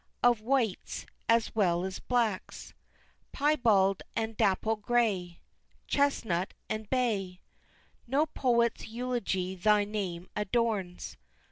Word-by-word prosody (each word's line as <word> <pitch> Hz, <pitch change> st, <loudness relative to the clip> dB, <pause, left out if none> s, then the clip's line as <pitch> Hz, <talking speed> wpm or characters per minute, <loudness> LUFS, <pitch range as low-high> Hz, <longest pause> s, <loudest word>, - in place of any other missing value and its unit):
Of 240 Hz, -3 st, +4 dB
whites 235 Hz, -4 st, -1 dB, 0.2 s
as 230 Hz, 0 st, +3 dB
well 180 Hz, -4 st, +2 dB
as 190 Hz, -1 st, -5 dB
blacks, 230 Hz, -6 st, -2 dB, 0.6 s
Pyebald 225 Hz, -10 st, +3 dB
and 225 Hz, 0 st, -2 dB
dapple 210 Hz, +3 st, +2 dB
gray, 205 Hz, -6 st, 0 dB, 0.4 s
Chestnut 220 Hz, -11 st, 0 dB
and 215 Hz, -1 st, -4 dB
bay 205 Hz, -8 st, 0 dB, 0.7 s
No 280 Hz, +5 st, +2 dB
poet's 235 Hz, -6 st, +1 dB
eulogy 225 Hz, -6 st, -2 dB
thy 210 Hz, +3 st, +3 dB
name 190 Hz, -4 st, -4 dB
adorns! 210 Hz, -3 st, -1 dB
215 Hz, 100 wpm, -30 LUFS, 190-240 Hz, 0.7 s, Of